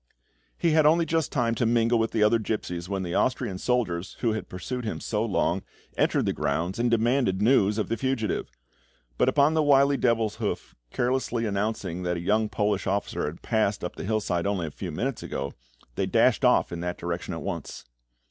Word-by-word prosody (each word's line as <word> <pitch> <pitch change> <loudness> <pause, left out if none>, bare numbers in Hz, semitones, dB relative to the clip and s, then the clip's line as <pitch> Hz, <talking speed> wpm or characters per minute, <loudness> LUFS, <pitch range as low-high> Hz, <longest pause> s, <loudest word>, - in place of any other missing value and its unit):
He 170 - +2
had 155 -1 +5
only 165 +2 +4
just 160 -1 0
time 120 -3 +1
to 115 - 0
mingle 115 0 +3
with 115 0 +1
the 110 - +1
other 115 +2 +4
gipsies 90 -5 -3
when 95 -1 -2
the 85 -1 -4
Austrian 100 -7 0
soldiers, 95 -8 -1
who 115 -2 +2
had 110 - -5
pursued 125 +7 -5
him 110 - -3
so 105 -1 -1
long, 115 -4 0 0.3
entered - - +2
the - - +1
grounds, 85 +8 -1
and 120 0 +2
demanded 115 -3 +2
news 105 -2 +3
of 110 - -1
the 115 - -1
fugitive; 115 -3 -1 0.7
but 125 - +4
upon 145 +3 +3
the 160 - +3
wily 140 -2 +4
Devilshoof 115 -3 -1 0.2
carelessly 125 -2 0
announcing 100 -4 -2
that 90 -1 -1
a - - -3
young 105 +5 +1
Polish 105 -2 0
officer 100 +1 -1
had 75 +3 -8
passed 110 -3 0
up 90 - -4
the - - -6
hillside 100 -4 -1
only 100 -4 -1
a 75 - -5
few 90 +3 -6
minutes 125 - -2
ago, 70 +1 -4 0.4
they - - -1
dashed - - +3
off - - +4
in 85 - -4
that 90 +1 -3
direction 85 0 -4
at - - -6
once. - - -5
110 Hz, 195 wpm, -26 LUFS, 95-125 Hz, 0.7 s, had